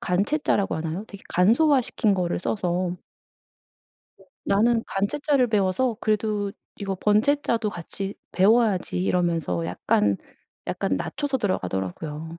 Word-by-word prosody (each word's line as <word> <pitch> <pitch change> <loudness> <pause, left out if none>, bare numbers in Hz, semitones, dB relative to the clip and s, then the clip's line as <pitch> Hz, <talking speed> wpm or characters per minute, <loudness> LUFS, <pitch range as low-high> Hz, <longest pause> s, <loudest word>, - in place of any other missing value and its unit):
간체자라고 200 +3 +1
하나요? 165 +5 -4
되게 200 - -12
간소화 260 - +4
시킨 215 -3 +1
거를 180 -2 -1
써서 180 -2 -1 1.2
네. - - -20 0.2
'나는 225 +3 +3
간체자를 260 +6 +1
배워서 215 +3 +1
그래도 210 -2 0 0.2
이거 195 -1 -3
번체자도 220 +2 +2
같이 195 +3 -6 0.2
배워야지.' 200 -2 +3
이러면서 165 - 0
약간 100 +3 +1 0.5
약간 - - -2
낮춰서 280 - -2
들어가더라구요. 150 - -3
195 Hz, 300 characters per minute, -25 LUFS, 175-225 Hz, 1.2 s, 간소화